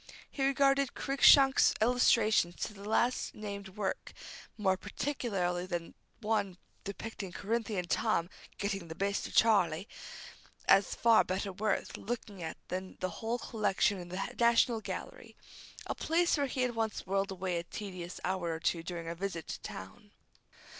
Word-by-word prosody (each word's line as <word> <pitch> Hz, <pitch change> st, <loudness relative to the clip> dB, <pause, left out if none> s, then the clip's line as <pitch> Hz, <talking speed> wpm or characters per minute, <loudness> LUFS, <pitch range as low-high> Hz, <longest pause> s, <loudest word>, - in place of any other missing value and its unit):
He 275 Hz, -, -2 dB
regarded 275 Hz, 0 st, +3 dB
Cruikshank's 275 Hz, 0 st, +6 dB
illustrations 220 Hz, -6 st, +3 dB
to -, -, -4 dB
the 205 Hz, +1 st, -9 dB
last 240 Hz, +3 st, +1 dB
named 200 Hz, -2 st, -7 dB
work 200 Hz, -2 st, -3 dB, 0.4 s
more 190 Hz, -3 st, +2 dB
particularly 195 Hz, -5 st, -2 dB
that 175 Hz, -2 st, -4 dB, 0.3 s
one 210 Hz, -4 st, 0 dB, 0.3 s
depicting 200 Hz, -1 st, -6 dB
Corinthian 210 Hz, -1 st, -2 dB
Tom 175 Hz, -2 st, +1 dB, 0.3 s
"getting 200 Hz, -3 st, -2 dB
the 160 Hz, -, -7 dB
best 200 Hz, +2 st, -1 dB
of -, -, -10 dB
Charley," 195 Hz, -5 st, +4 dB, 0.8 s
as 195 Hz, -1 st, +5 dB
far 230 Hz, -1 st, +5 dB
better 190 Hz, +1 st, -3 dB
worth 210 Hz, +2 st, -1 dB
looking 210 Hz, -4 st, -5 dB
at 160 Hz, -1 st, -5 dB
than 185 Hz, +1 st, -5 dB
the 185 Hz, -, -1 dB
whole 230 Hz, +2 st, -1 dB
collection 210 Hz, -4 st, 0 dB
in 175 Hz, -1 st, -8 dB
the 185 Hz, +2 st, -4 dB
National 235 Hz, -1 st, +4 dB
Gallery, -, -, -7 dB, 0.5 s
a -, -, -2 dB
place 340 Hz, +2 st, +2 dB
where 285 Hz, -2 st, 0 dB
he 255 Hz, 0 st, -1 dB
had 250 Hz, -1 st, 0 dB
once 225 Hz, -2 st, -2 dB
whirled 195 Hz, +1 st, 0 dB
away 185 Hz, -2 st, -2 dB
a -, -, -5 dB
tedious 180 Hz, -1 st, -7 dB
hour 180 Hz, -2 st, -1 dB
or 160 Hz, -, -4 dB
two 170 Hz, 0 st, 0 dB
during 170 Hz, 0 st, -6 dB
a 165 Hz, -, -2 dB
visit 170 Hz, -2 st, -4 dB
to -, -, -5 dB
town. 95 Hz, -, -9 dB
200 Hz, 155 wpm, -32 LUFS, 180-230 Hz, 0.8 s, Cruikshank's